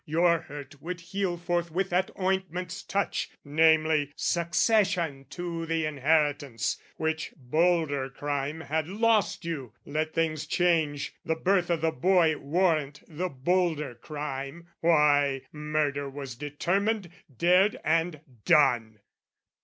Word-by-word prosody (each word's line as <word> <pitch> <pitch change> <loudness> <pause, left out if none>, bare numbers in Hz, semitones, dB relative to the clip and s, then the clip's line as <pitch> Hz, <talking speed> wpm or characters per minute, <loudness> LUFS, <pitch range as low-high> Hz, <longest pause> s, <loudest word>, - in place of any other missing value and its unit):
"Your 170 +2 +3
hurt 145 -1 -10
would 180 +1 -5
heal 175 +1 -2
forthwith 175 +1 -1
at 185 +1 +2
ointment's 185 -1 -2
touch 200 0 -1 0.2
"Namely, 155 -1 +3
succession 170 -4 +1
to 170 -2 -5
the 165 -1 0
inheritance 145 -4 +1 0.2
"Which 160 0 -2
bolder 155 0 +1
crime 145 +3 -3
had 155 0 -2
lost 215 -1 +1
you: 140 -9 -5
let 155 +2 -2
things 160 -2 0
change, 160 -5 +1
"The 160 - 0
birth 180 +1 +1
o' 170 - +2
the 160 0 0
boy 165 +2 +3
warrant 150 -2 0
the 175 +3 -3
bolder 155 -1 0
crime, 145 +5 -6
"Why, 145 -4 +3
murder 150 -2 -1
was 135 -2 -7
determined, 180 - -1 0.3
dared, 185 +6 +4
and 160 0 +1 0.2
done. 115 -7 +3
160 Hz, 115 wpm, -28 LUFS, 145-175 Hz, 0.3 s, dared